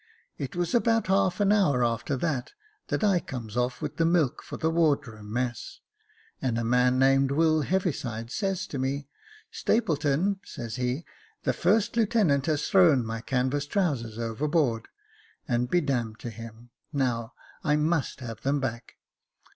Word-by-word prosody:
It 135 +2 -4
was 175 -1 -1
about 230 -1 +3
half 190 0 +2
an 200 0 +4
hour 175 -12 +3
after 120 +4 -1
that, 140 -3 -2 0.3
that - - -1
I 195 -4 +4
comes 120 -8 -7
off 125 0 -1
with - - -4
the 165 - +2
milk 165 -5 +2
for - - -8
the 160 - 0
wardroom 140 -10 0
mess, 120 +1 -3 0.6
and 120 -3 0
a 115 - -1
man 125 +2 +3
named 135 +1 +4
Will 155 +2 +3
Heaviside 135 - -2
says 195 -2 -1
to 140 - -5
me, 135 +1 -2 0.2
' 430 0 -24
Stapleton,' 170 -1 +1
says 115 -1 -6
he, 125 +5 -2 0.2
' 440 0 -32
the - - +1
first 225 +1 +2
lieutenant 210 - +2
has 150 -2 0
thrown 160 -10 +5
my 115 0 -4
canvas 130 +4 -1
trousers 140 - -1
overboard, 115 +1 0 0.6
and 120 +1 0
be 175 - +3
d 140 -3 0
d 120 -3 -1
to 120 - -6
him; 115 +1 -11 0.2
now 125 -4 -1 0.3
I 150 -1 +3
must 150 -2 0
have 115 -3 -7
them 140 +2 +1
back.' 115 -3 -4
140 Hz, 165 wpm, -27 LUFS, 120-170 Hz, 0.6 s, thrown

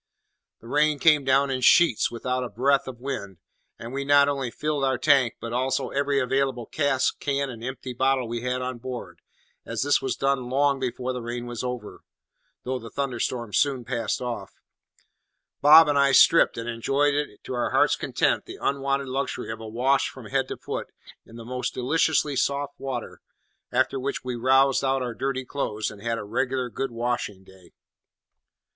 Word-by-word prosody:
The 115 - -13
rain 150 +3 +2
came 150 0 +4
down 135 +1 +3
in 130 -1 -2
sheets, 165 -2 +5
without 125 +2 -2
a 125 - -5
breath 135 +6 +1
of 125 -2 -8
wind; 105 -8 -5 0.4
and 115 +2 -8
we 140 +1 -2
not 140 0 +5
only 135 -3 -1
filled 150 +3 -2
our 130 -1 +1
tank, 130 -1 +3
but 115 0 -6
also 130 +1 0
every 140 0 0
available 135 -2 0
cask, 135 -2 0
can, 140 -1 -1
and 115 -2 -10
empty 130 0 -5
bottle 130 0 +1
we 115 0 -4
had 125 +1 -2
on 125 -1 -4
board, 125 0 -7 0.4
and - - -8
as - - 0
this 145 +1 +2
was 130 - -2
done 135 -2 0
long 140 +1 +2
before 130 0 -3
the 125 - -5
rain 120 +1 -5
was 120 -1 -5
over 125 -4 -6 0.6
(though 130 0 -3
the 115 -1 -10
thunderstorm 120 -4 -3
soon 135 -4 +1
passed 120 0 -2
off), 115 -6 -5 1.1
Bob 155 +2 +9
and 145 -1 +2
I 140 -1 +4
stripped, 165 0 +6
and 115 0 -5
enjoyed 135 +5 +1 0.3
to - - -6
our 120 - -1
heart's - - +3
content - - 0
the - - -8
unwonted 140 0 -1
luxury 130 -3 -3
of 110 - -6
a 110 - -8
wash 130 +5 +1
from 130 -4 -12
head 135 +3 -1
to - - -6
foot - - -5 0.4
in 115 - -14
the 115 -1 -9
most 125 +1 -4
deliciously 150 +2 +1
soft 140 +1 -1
water, 130 -3 -5 0.5
after 135 - +1
which 140 +2 -3
we 125 -1 -3
roused 135 +3 +3
out 135 -1 +1
our 120 -1 -4
dirty 130 +1 -3
clothes, 110 -6 -3
and 100 -2 -12
had 115 +1 -1
a - - -5
regular 125 +3 -2
good 135 +3 -3
washing 115 -4 -3
day. 95 -2 -19
130 Hz, 185 wpm, -25 LUFS, 120-140 Hz, 1.1 s, Bob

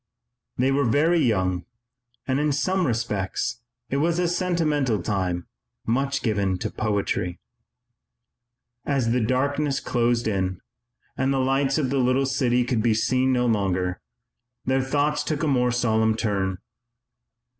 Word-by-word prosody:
They 130 +2 +2
were 140 0 +2
very 160 +7 +3
young 95 - +1 0.6
and, 130 +1 +1
in 150 0 +1
some 185 +5 +1
respects, 115 -1 -2 0.3
it 135 - +1
was 165 +4 +1
a 180 -1 +1
sentimental 160 - 0
time, 90 -4 -1 0.4
much 135 +4 0
given 100 -5 0
to - - -4
poetry. 100 -4 -1 1.4
As 135 -5 0
the 125 +1 +2
darkness 140 +4 0
closed 120 -1 0
in 95 -3 -1 0.6
and 135 +1 0
the 135 - +1
lights 135 +2 +1
of 135 -4 0
the 140 - +1
little 130 +2 +2
city 125 -2 +1
could 120 -2 0
be 110 -1 +2
seen 130 +4 +2
no 125 -1 +2
longer, 95 -5 0 0.6
their 130 +1 +2
thoughts 145 +2 0
took 155 0 -2
a - - +1
more 125 -3 +2
solemn 110 -2 +2
turn. 95 -4 -1
125 Hz, 140 wpm, -24 LUFS, 110-140 Hz, 1.4 s, very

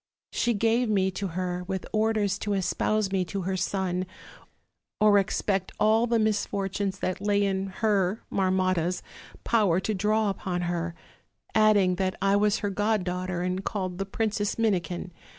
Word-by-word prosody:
She 240 -1 +1
gave 230 +3 +2
me 190 -2 +2
to 195 +2 -3
her, 180 -1 -2
with 190 -1 -3
orders 215 -2 +1
to 205 -1 -1
es 185 -2 0
pouse 215 -2 0
me 190 -1 +1
to 195 +2 -4
her 190 +1 -1
son, 185 0 -1 0.9
or 210 -1 +6
expect 195 0 -1
all 220 +2 +4
the 235 0 +2
misfortunes 200 -2 -1
that 185 +1 -2
lay 205 0 +2
in 195 0 -1 0.2
her, 205 -1 +2
Marmotta's, 185 -2 +1 0.4
power 205 -7 +3
to 215 - -1
draw 210 +1 +1
upon 180 -2 -3
her; 170 -1 -2 0.6
adding 205 -4 +4
that 185 0 0
I 195 +1 +3
was 210 +1 +3
her 200 - 0
god 210 0 +1
daughter 180 0 -2
and 185 +1 -2
called 185 -3 -3
the 195 - -2
Princess 210 0 -1
Min 225 -2 +3
ikin. 175 0 -4
195 Hz, 165 wpm, -27 LUFS, 185-210 Hz, 0.9 s, or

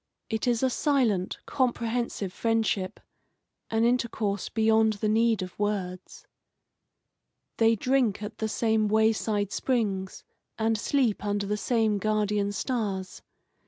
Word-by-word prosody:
It 220 +2 -1
is 240 0 +1
a 260 - +4
silent, 235 -11 +1
comprehensive 235 -6 -1
friendship, 225 -4 0 0.7
an 225 0 +1
intercourse 230 -5 0
beyond 220 0 +3
the 210 +1 -2
need 225 -1 +2
of 185 +1 -10
words. 190 -3 -3 1.3
They 225 0 +4
drink 235 -3 +1
at 210 +1 -7
the 220 - -1
same 220 -1 +1
way 220 +1 +4
side 205 -2 -1
springs, 200 -7 -1 0.3
and 225 0 +1
sleep 235 -1 0
under 205 -1 -1
the 210 +1 -1
same 220 -1 +1
guardian 210 -1 0
stars. 205 -4 -3
220 Hz, 125 wpm, -27 LUFS, 205-230 Hz, 1.3 s, a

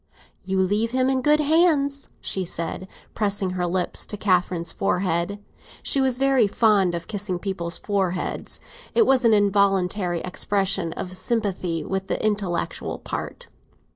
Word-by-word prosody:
"You 190 0 -1
leave 205 +5 +1
him 255 +2 +1
in 260 -1 +1
good 300 +3 +4
hands," 295 -3 +2
she 190 - -1
said, 170 +2 -4 0.3
pressing 200 -3 -1
her 180 -1 -1
lips 180 0 -1
to 210 - -5
Catherine's 180 -3 +1
forehead. 180 0 0 0.5
(She 275 - +2
was 260 -2 +2
very 265 -4 +3
fond 200 -4 +3
of 170 - -6
kissing 205 -3 -3
people's 175 -3 -3
foreheads; 190 -3 -2 0.4
it 455 - +5
was 260 -2 +3
an 225 - +6
involuntary 195 -3 +2
expression 195 -2 0
of 185 0 -6
sympathy 185 -7 -1
with 190 0 -3
the - - -1
intellectual 200 -5 -2
part.) - - -6
195 Hz, 140 wpm, -24 LUFS, 180-230 Hz, 0.5 s, an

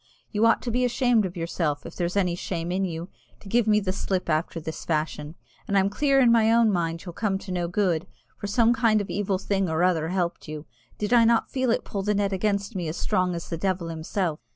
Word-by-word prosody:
You 215 +2 +3
ought 225 - +3
to 240 - -2
be 250 +2 +1
ashamed 245 -4 +2
of 180 0 -10
yourself, 165 -3 -2
if - - -9
there's 175 +2 -2
any 180 -3 +2
shame 175 -1 -4
in 190 +1 0
you, 170 0 -5 0.3
to - - -14
give 235 +2 +2
me 210 0 +5
the 190 -2 -2
slip 185 -3 -2
after 160 +2 -1
this 160 0 -6
fashion! 155 -1 -2 0.3
And 200 - +1
I'm 195 +1 +3
clear 275 +4 +2
in 245 -3 +5
my 225 -1 +4
own 230 -1 +4
mind 165 -2 -2
you'll 175 - -7
come 200 0 -1
to 190 0 -8
no 175 -1 -1
good, 180 -2 0 0.3
for 205 - -6
some 230 +3 +3
kind 225 -2 +3
of 205 - -4
evil 200 -1 0
thing 195 -1 -1
or 160 +2 +1
other 165 -3 +2
helped 175 -1 -2
you 155 0 -7 0.3
did 210 +3 -1
I 235 -1 +7
not 230 0 +2
feel 260 -2 0
it 230 - +1
pull 200 - -3
the 210 +1 0
net 200 -1 0
against 200 +2 -1
me 175 -3 -2
as 155 - -4
strong 180 -1 0
as 170 - -6
the 165 - -4
devil 185 -1 -1
himself?" 165 0 -2
190 Hz, 245 wpm, -25 LUFS, 170-215 Hz, 0.3 s, I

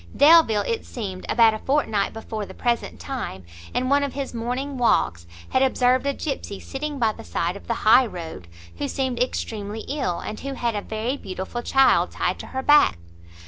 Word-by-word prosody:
Delvile, 290 -8 +6
it 460 -1 -2
seems, 195 -6 -6
about 225 -1 +5
a 215 - -4
fortnight 220 -8 0
before 220 -1 -5
the - - -11
present 240 -1 -1
time, 245 - -5 0.3
in 255 - -1
one 280 +2 +3
of 280 -2 -2
his 275 -2 -4
morning 250 +4 -3
walks, 85 - +1 0.2
had 260 - +2
observed 255 0 +3
a 280 - +1
gipsey 270 -9 -4
sitting 290 +1 -5
by 225 -4 +2
the - - -11
side 175 +2 -2
of 200 - -11
the 235 - 0
high 240 +3 +7
road, 165 - -8 0.3
who - - -1
seemed 260 - -2
extremely 220 -4 -3
ill, 265 - -2
and 215 - -6
who 275 0 -5
had 235 -2 -1
a 205 - -2
very 225 +6 -3
beautiful 190 +2 -5
child 270 +2 +4
tied - - -2
to - - -8
her 265 0 -4
back. 295 - +5
240 Hz, 190 wpm, -24 LUFS, 210-270 Hz, 0.3 s, high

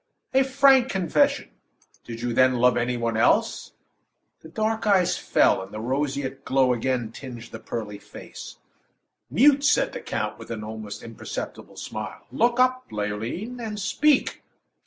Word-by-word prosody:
"A 265 - +5
frank 265 -1 +4
confession! 185 -4 +1 0.5
Did 115 0 -7
you, 120 -1 -1
then, 130 +1 +4
love 125 0 +4
any 120 +1 0
one 115 -1 -1
else?" 110 - +1 0.7
The 160 - -13
dark 220 +4 -1
eyes 190 -4 +3
fell, - - +2
and 95 +1 -10
the 110 - -6
roseate 135 +2 -2
glow 130 -2 +3
again 120 -1 -1
tinged 120 -1 -9
the - - -7
pearly 105 -3 -6
face. - - -11 0.7
"Mute!" 280 +3 +5
said - - +3
the - - -6
count, - - -3
with - - -11
an 110 -2 -5
almost 105 -1 -7
imperceptible 115 -1 -7
smile. - - -7
"Look 240 - +2
up, 255 0 +2
Leoline, 110 - -4
and 215 -3 -5
speak." 280 +8 +2
130 Hz, 150 wpm, -25 LUFS, -, 0.7 s, A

